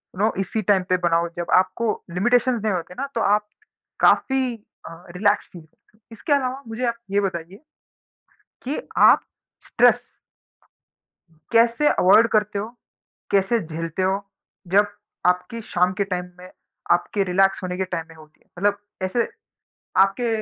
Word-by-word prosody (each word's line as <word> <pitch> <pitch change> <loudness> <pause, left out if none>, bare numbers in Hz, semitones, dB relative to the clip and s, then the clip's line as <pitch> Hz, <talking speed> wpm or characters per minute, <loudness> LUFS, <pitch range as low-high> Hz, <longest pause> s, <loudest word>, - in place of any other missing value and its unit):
You 185 - -10
know, 220 - +2
इसी 195 +3 -2
time 195 -2 +2
पे 185 - +3
बनाओ। 170 0 +2
जब 175 - -4
आपको 190 +5 +1 0.2
लिमिटेशंस 240 +5 +2
नहीं 215 -3 +1
होते 180 0 -4
ना, 275 - -3
तो 230 - 0
आप 210 +1 +2 0.5
काफ़ी 260 -3 +2 0.3
अ, 165 +1 -13
रिलैक्स 205 +1 +2
फील 175 - -10
करते 160 +6 -31
हो। - - -34
इसके 255 +7 -2
अलावा 265 0 -1
मुझे 230 +3 -3
आप 235 - 0 0.2
ये 200 - +2
बताइए 180 0 -4 1.1
कि 275 +4 -2 0.2
आप - - +6 0.4
स्ट्रेस - - +5 1.6
कैसे 235 +5 +3
अवॉइड 215 +5 +5
करते 210 -1 +1
हो, 210 - -4 0.6
कैसे 200 +4 +2
झेलते 165 +2 -4
हो, 190 +1 +1 0.5
जब 205 +3 +3 0.4
आपकी 205 +6 -2
शाम 180 -2 0
के 200 - -1
टाइम 180 -2 -3
में, 180 +1 -12 0.4
आपके 200 -3 +1
रिलैक्स 195 +1 +2
होने 180 0 -3
के 190 - 0
टाइम 170 -3 -4
में 165 - -14
होती 155 -1 -18
है? - - -32
मतलब 205 +1 +2 0.3
ऐसे 210 +6 0 0.8
आपके 195 +5 -1
200 Hz, 155 wpm, -22 LUFS, 180-230 Hz, 1.6 s, आप